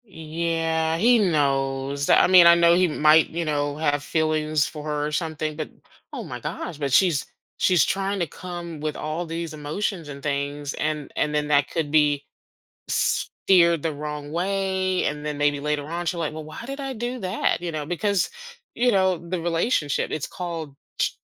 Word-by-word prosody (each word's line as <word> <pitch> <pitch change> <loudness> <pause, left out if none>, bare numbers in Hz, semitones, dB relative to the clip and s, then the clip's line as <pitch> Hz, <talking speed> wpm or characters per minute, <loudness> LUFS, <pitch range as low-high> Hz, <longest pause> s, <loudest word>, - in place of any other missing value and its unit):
Yeah 165 -2 -1
he 235 +6 +5
knows, 140 -5 0
I - - +6
mean, 180 -2 +8
I 170 - +8
know 170 0 +5
he 180 +1 +4
might, 155 0 +4
you 170 +1 -3
know, 145 -1 -1
have 145 -2 0
feelings 155 -1 +1
for 150 -2 -8
her 150 -1 -2
or - - -4
something, 155 -1 -2
but 155 0 -5 0.4
oh - - -5
my - - -7
gosh, 170 - -5
but 140 -2 -2
she's 165 0 +3 0.3
she's 180 -7 +4
trying 195 +1 -1
to 170 - 0
come 170 0 -7
with 155 0 -3
all 155 +3 -3
these 165 0 -4
emotions 155 +3 -3
and 140 -1 -9
things, 145 0 -2
and 150 -1 -3
and 150 0 0
then 150 0 0
that 145 -1 +3
could 160 -3 -2
be 145 -2 +3 0.6
s - - 0 0.2
steered 170 -4 +5
the 160 -2 -1
wrong 150 0 -6
way, 190 +1 0
and 150 0 -2
then 150 -1 -3
maybe 145 0 +1
later 150 0 -1
on 170 +2 -4
she's 170 - -1
like, 165 -3 -2
"Well, 155 0 -7
why 155 +8 -9
did 275 +2 -6
I 270 -1 -4
do 245 +2 -4
that?" 190 0 0
You 175 -1 -4
know, 150 -1 -3
because, 185 +4 0 0.4
you 245 +1 +2
know, 190 -4 +3
the 170 +1 -4
relationship 165 - 0
it's 155 - -3
called 165 -5 -6 0.2
tr - - +3
160 Hz, 190 wpm, -24 LUFS, 150-175 Hz, 0.6 s, mean